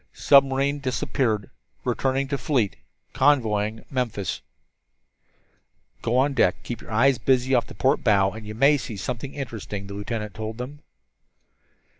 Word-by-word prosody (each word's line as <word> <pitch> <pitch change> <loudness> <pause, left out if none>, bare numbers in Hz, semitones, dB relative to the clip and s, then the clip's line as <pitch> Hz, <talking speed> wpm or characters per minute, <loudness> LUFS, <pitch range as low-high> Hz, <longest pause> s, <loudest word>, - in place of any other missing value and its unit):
"Submarine 140 +1 +4
disappeared. 125 -4 -1 0.3
Returning 135 +1 0
to 140 - 0
fleet. 120 -5 0 0.4
Convoying 110 -6 +2
Memphis." 115 - -2 1.6
"Go 120 +2 0
on 140 +2 +3
deck, - - +3
keep 120 -2 -6
your - - -13
eyes 125 +4 +3
busy 130 0 +2
off 120 -2 +3
the - - -11
port 135 +2 +1
bow, 100 -3 +4
and 110 +1 -9
you 105 - -6
may 140 +5 +5
see 120 -5 -6
something 125 +7 -5
interesting," 110 -7 -5
the 100 - -8
lieutenant 105 0 -4
told 110 0 -5
them. 130 +4 -7
125 Hz, 140 wpm, -24 LUFS, 110-135 Hz, 1.6 s, may